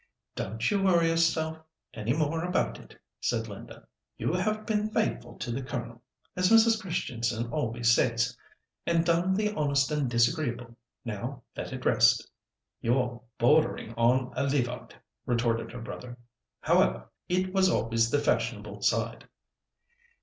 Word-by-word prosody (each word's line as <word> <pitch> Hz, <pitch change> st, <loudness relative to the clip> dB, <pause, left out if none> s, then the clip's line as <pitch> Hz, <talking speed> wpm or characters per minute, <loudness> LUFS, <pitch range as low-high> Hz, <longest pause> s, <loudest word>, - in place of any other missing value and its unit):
"Don't 110 Hz, +4 st, -2 dB
you 200 Hz, -1 st, +1 dB
worry 170 Hz, -4 st, +4 dB
yourself 160 Hz, -1 st, +1 dB, 0.3 s
any 110 Hz, +1 st, -2 dB
more 155 Hz, +3 st, 0 dB
about 180 Hz, +1 st, 0 dB
it," -, -, -16 dB, 0.2 s
said -, -, -1 dB
Linda. -, -, -10 dB, 0.3 s
"You -, -, -1 dB
have 215 Hz, 0 st, -1 dB
been 215 Hz, -1 st, 0 dB
'faithful' 215 Hz, 0 st, -2 dB
to 120 Hz, -, -4 dB
the 125 Hz, +3 st, -2 dB
Colonel—as 125 Hz, +8 st, -4 dB
Mrs. 225 Hz, -1 st, +5 dB
Christianson 120 Hz, -, -2 dB
always 115 Hz, -4 st, +1 dB
says—and 125 Hz, +8 st, -1 dB
done 175 Hz, +3 st, +2 dB
the 210 Hz, +1 st, 0 dB
honest 140 Hz, -5 st, +1 dB
and 150 Hz, -4 st, 0 dB
disagreeable. 120 Hz, -1 st, 0 dB, 0.3 s
Now 120 Hz, +5 st, -5 dB
let -, -, -5 dB
it -, -, -6 dB
rest." -, -, +4 dB, 0.5 s
"You're 125 Hz, 0 st, 0 dB, 0.2 s
bordering 145 Hz, -2 st, +2 dB
on 125 Hz, +2 st, +2 dB
a -, -, 0 dB
Levite," 125 Hz, -3 st, -2 dB, 0.3 s
retorted 115 Hz, -1 st, 0 dB
her 120 Hz, 0 st, -8 dB
brother. 120 Hz, +1 st, -8 dB, 0.4 s
"However, -, -, +2 dB, 0.2 s
it 185 Hz, +1 st, 0 dB
was 190 Hz, -1 st, +4 dB
always 115 Hz, -3 st, +1 dB
the 145 Hz, -, +2 dB
fashionable 145 Hz, -, -1 dB
side." -, -, 0 dB
140 Hz, 135 wpm, -28 LUFS, 120-170 Hz, 0.5 s, Mrs